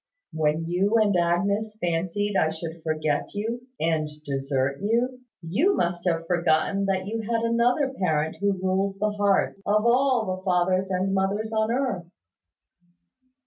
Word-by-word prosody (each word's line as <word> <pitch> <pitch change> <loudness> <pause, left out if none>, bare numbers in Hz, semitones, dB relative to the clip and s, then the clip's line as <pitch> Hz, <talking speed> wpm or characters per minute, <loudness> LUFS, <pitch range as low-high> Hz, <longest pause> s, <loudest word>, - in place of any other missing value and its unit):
When 155 +1 0
you 190 +5 +1
and 210 -3 +3
Agnes 200 +5 0
fancied 180 +4 -1
I 160 - +3
should 160 +1 -6
forget 155 +1 -1
you 230 +4 -3
and 160 -2 0 0.2
desert 135 -1 -1
you, 240 +5 0 0.2
you 260 - +2
must 175 +1 -1
have 165 -1 0
forgotten 175 +3 +1
that 190 -1 0
you 225 +3 -3
had 230 +1 -1
another 245 +4 +2
Parent 160 -4 0
who 200 0 +2
rules 190 +1 -1
the 210 +1 0
hearts 200 -1 +1
of 210 +2 +2
all 250 -1 +3
the - - -11
fathers 185 0 +1
and 190 +1 0
mothers 200 +3 -1
on 220 0 +1
earth." 240 -9 -1
195 Hz, 145 wpm, -25 LUFS, 170-220 Hz, 0.2 s, and